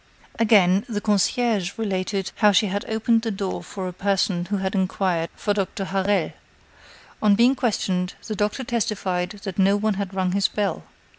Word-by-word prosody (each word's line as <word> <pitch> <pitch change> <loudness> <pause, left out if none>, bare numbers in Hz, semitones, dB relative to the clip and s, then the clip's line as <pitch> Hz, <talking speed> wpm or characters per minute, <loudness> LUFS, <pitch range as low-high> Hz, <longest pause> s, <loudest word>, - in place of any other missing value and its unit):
Again, 200 -4 +4
the 210 -3 -2
concierge 210 -1 +1
related 195 -2 -2
how 210 -2 +5
she 205 +2 +4
had 200 +1 -2
opened 225 +1 +2
the 225 - -2
door 195 -2 -3
for 190 -2 -6
a 180 - -5
person 190 -1 0
who 200 +3 -2
had 190 0 -2
inquired 185 -3 0
for 205 - -1
Doctor 195 -1 -2
Harel. 195 +1 0 0.9
On 210 -2 +5
being 240 +5 +5
questioned, 190 -8 -1
the 215 - -4
doctor 210 +6 -1
testified 195 -7 -1
that 195 -1 -5
no 195 +1 +4
one 215 +1 +1
had 190 -1 -5
rung 185 -1 0
his 195 +1 +2
bell. 205 -2 -2
200 Hz, 170 wpm, -23 LUFS, 190-215 Hz, 0.9 s, how